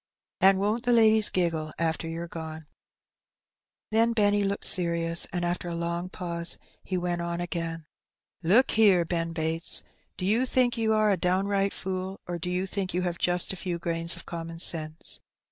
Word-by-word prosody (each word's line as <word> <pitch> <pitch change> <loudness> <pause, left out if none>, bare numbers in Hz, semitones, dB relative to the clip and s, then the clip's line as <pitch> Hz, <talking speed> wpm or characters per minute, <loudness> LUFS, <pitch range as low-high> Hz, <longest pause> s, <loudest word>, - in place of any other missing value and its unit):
And 195 0 +6
won^t 210 +4 0
the 245 0 0
ladies 220 -2 +5
giggle 165 -4 -1
after 165 0 -1
you^re 165 +1 -5
gone! 160 -1 -7
^^ - - -22 1.3
Then 230 +1 +3
Benny 205 -2 +2
looked 200 0 0
serious, 170 -2 +4
and 175 -2 -2
after 175 0 -2
a 170 - -4
long 170 +1 -3
pause 170 -2 -3 0.3
he 185 - -3
went 175 -1 -2
on 170 0 -3
again 165 -2 -4 0.2
— - - -66
" - - -53
Look 255 +6 +5
here, 200 -6 +4
Ben 165 0 -2
Bates: 160 0 0 0.3
do 185 - -3
you 230 +6 +2
think 250 -1 +2
you 225 -2 0
are 215 -1 +3
a 195 - +2
down 185 +2 +1
right 200 -1 +1
fool, 190 0 -4
or 175 -1 -4
do 180 - -4
you 180 +1 -1
think 190 -2 -3
you 180 - 0
have 175 -1 -3
just 175 +1 +1
a - - -5
few 180 -1 -4
grains 170 0 -1
of - - -9
common 165 -1 -6
sense? 155 -2 -2
175 Hz, 195 wpm, -27 LUFS, 170-200 Hz, 1.3 s, And